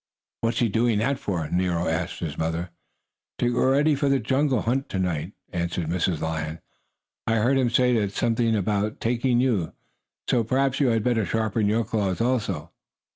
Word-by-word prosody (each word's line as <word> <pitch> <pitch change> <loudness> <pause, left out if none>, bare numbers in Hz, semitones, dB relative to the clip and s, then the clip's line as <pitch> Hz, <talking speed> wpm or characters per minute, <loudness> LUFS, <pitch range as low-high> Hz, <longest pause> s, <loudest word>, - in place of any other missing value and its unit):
"What's 115 0 -1
he 120 - +3
doing 115 +1 +1
that 130 +5 0
for?" 85 -6 -2
Nero 90 -1 0
asked 80 0 -2
his 75 -4 -3
mother. 80 +2 -2 0.7
"To 120 0 +1
get - - -2
ready 140 +5 +3
for 140 0 +1
the 135 - +4
jungle 130 0 +1
hunt 135 +4 -1
to - - -3
night," 90 -5 -2 0.2
answered 85 -1 -2
Mrs. 85 -1 0
Lion. 80 0 -3 0.7
"I 115 - +2
heard 120 +5 +3
him 125 -2 +2
say 120 -3 +3
something 115 +3 +1
about 105 +1 -1
taking 120 +1 +1
you, 115 -10 +1 0.5
so 120 - +2
perhaps 130 +3 +1
you 140 - +3
had 115 -3 +2
better 120 -2 +2
sharpen 110 +1 0
your 110 +3 +2
claws, 100 -4 -1
also." 110 -10 -1
110 Hz, 175 wpm, -25 LUFS, 90-125 Hz, 0.7 s, the